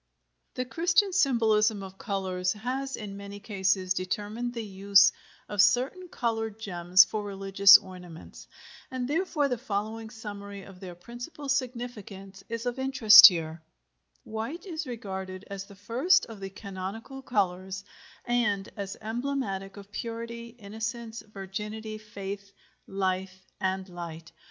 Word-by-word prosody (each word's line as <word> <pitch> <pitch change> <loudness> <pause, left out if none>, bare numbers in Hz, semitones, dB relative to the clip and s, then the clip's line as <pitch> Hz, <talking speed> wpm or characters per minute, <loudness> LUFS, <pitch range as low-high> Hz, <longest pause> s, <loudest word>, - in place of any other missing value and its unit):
The 255 -2 -2
Christian 345 +7 +2
symbolism 220 - +3
of 190 0 -10
colors 185 -3 -1
has 260 +5 -3
in 200 -2 -7
many 200 0 -8
cases 190 -3 0
determined 210 +6 -3
the 230 - -3
use 200 0 +5 0.4
of 205 -2 +3
certain 255 - +2
colored 225 -6 -2
gems 180 -3 +5
for 215 -1 -4
religious 195 0 +7
ornaments, 180 -3 -12 0.4
and 255 -1 -3
therefore 305 -1 +1
the 250 -4 -2
following 220 -1 -3
summary 205 -3 -8
of 190 -1 -13
their 180 -2 -8
principal 245 - -9
significance 230 -7 -4
is 230 +1 -4
of 245 +1 -2
interest 230 -5 +10
here: 165 -4 -2 0.6
WHITE 225 - -5
is 330 -5 -5
regarded 190 -5 -6
as 195 0 -5
the 200 - -14
first 240 - +3
of 225 -3 -10
the 195 0 -5
canonical 200 +6 -7
colors, 190 -5 -1 0.4
and 215 -5 +1
as 195 -1 -5
emblematic 220 -4 -3
of 200 0 -12
purity, 235 +1 -5
innocence, 225 +1 -5
virginity, 210 +2 -6
faith, 200 -1 -7 0.3
life, 190 -1 -2
and 190 0 -1
light. 170 -2 -8
210 Hz, 130 wpm, -28 LUFS, 195-235 Hz, 0.6 s, interest